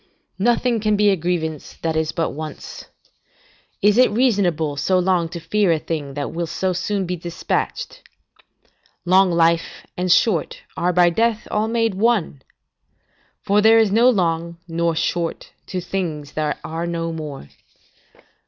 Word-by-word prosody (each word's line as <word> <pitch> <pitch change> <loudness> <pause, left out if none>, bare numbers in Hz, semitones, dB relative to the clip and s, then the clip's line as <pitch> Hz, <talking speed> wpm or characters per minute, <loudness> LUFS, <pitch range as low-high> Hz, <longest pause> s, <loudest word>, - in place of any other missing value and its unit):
Nothing 240 +2 +2
can 215 0 +1
be 205 0 +4
a - - +3
grievance 160 -3 -3
that 165 -1 0
is 160 -1 0
but 165 - -1
once. 155 0 -8 1.0
Is 210 +3 +4
it 255 - +6
reasonable 195 - +1
so 165 +7 +1
long 180 -2 +1
to 170 - -6
fear 190 +3 +1
a 165 - +3
thing 150 -3 -5
that 145 -1 -3
will 170 0 -3
so 185 +3 -1
soon 190 +2 -2
be 180 +1 -2
despatched? 170 0 -3 1.0
Long 185 +1 +4
life, 165 0 +1
and 180 0 -1
short, 180 -1 +2 0.2
are 175 +2 +1
by 175 0 +4
death 225 +3 0 0.2
made 225 -2 +1
all 190 - -7
one; 210 - +1 1.0
for 205 +1 +3
there 220 +1 +6
is 220 -3 +3
no 235 +4 +5
long, 170 -5 0
nor 170 0 0
short, 170 +1 -2 0.2
to 185 - -3
things 170 -6 -4
that 155 -1 -2
are 165 +2 -4
no 165 -1 -3
more. 150 - -7
175 Hz, 155 wpm, -21 LUFS, 165-205 Hz, 1.0 s, it